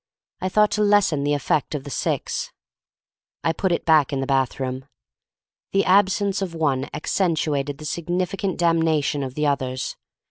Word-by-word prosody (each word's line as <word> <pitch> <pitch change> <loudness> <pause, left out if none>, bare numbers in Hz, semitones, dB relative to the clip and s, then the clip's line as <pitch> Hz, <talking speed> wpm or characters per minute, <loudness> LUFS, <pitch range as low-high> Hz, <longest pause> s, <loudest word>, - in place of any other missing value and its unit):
I 185 - -2
thought 210 +2 +3
to 210 - 0
lessen 205 -8 +3
the 145 0 +1
effect 145 +1 0
of 140 - -4
the 140 - -8
six. - - -2 0.9
I 165 - +2
put 190 +3 -1
it 170 - -1
back 155 -3 +4
in 140 - -1
the 135 - -1
bathroom. 130 -1 -1 0.9
The 195 - +3
absence 195 +1 +3
of 180 -3 -3
one 140 -4 0
accentuated 150 -4 -1
the 155 - -9
significant 180 +4 -2
damnation 160 -4 +2
of 130 -1 -5
the 150 - 0
others. 130 -3 -1
155 Hz, 155 wpm, -23 LUFS, 140-185 Hz, 0.9 s, back